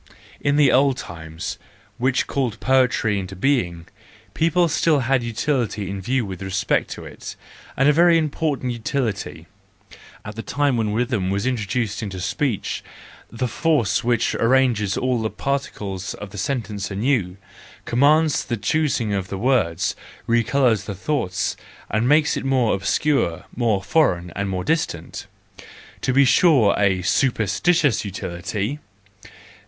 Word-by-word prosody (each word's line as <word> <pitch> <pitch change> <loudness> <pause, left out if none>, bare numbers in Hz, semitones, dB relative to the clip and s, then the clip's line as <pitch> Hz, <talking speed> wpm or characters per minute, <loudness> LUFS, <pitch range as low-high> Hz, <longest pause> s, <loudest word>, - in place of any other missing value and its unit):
In 145 0 +1
the 145 -3 +5
old 135 0 +3
times 80 0 -7 0.4
which 130 +1 +1
called 130 -6 -2
poetry 125 -5 +2
into 95 0 -6
being, 90 -8 0 0.5
people 170 +2 +2
had 170 - +1
still 150 -4 +2 0.2
utility 115 -4 -2
in 100 -1 -5
view' 125 +4 0
with 95 -2 -7
respect 95 0 0
to - - -10
it, - - -9 0.4
and 135 - +4
a 150 - +6
very 170 +2 +5
important 150 -4 -1
utility— 115 -2 -3 0.8
at 105 - -6
the 115 - -4
time 140 +2 0
when 110 -3 0
rhythm 115 -5 0
was 100 +3 -1
introduced 115 -3 -1
into 95 -4 -5
speech, 125 - -2 0.5
the 120 +2 -2
force 125 - +1
which 120 -1 +1
arranges 115 -5 +2
all 125 -2 0
the 110 - -1
particles 105 -10 -4
of 105 -1 -9
the 100 - -9
sentence 105 -3 -3
anew, 100 -3 0 0.5
commands 150 +5 +3
the 120 - -3
choosing 120 -1 0
of 95 -2 -2
the 95 - -5
words, 110 -8 +1 0.3
recolours 115 -2 +2
the 100 - -5
thought, 95 -5 -1 0.4
and 110 +4 +1
makes 150 0 +4
it - - -3
more 130 -4 +2
obscure, 100 - 0
more 110 -5 +1
foreign, 90 - +1
and 100 0 -2
more 90 -1 -2
distant: 155 - -2 0.7
to - - 0
be 135 +2 +5
sure 130 - +5
a 95 -3 +2
superstitious 130 - +2
utility! 100 +6 -4
115 Hz, 140 wpm, -22 LUFS, 100-135 Hz, 0.8 s, a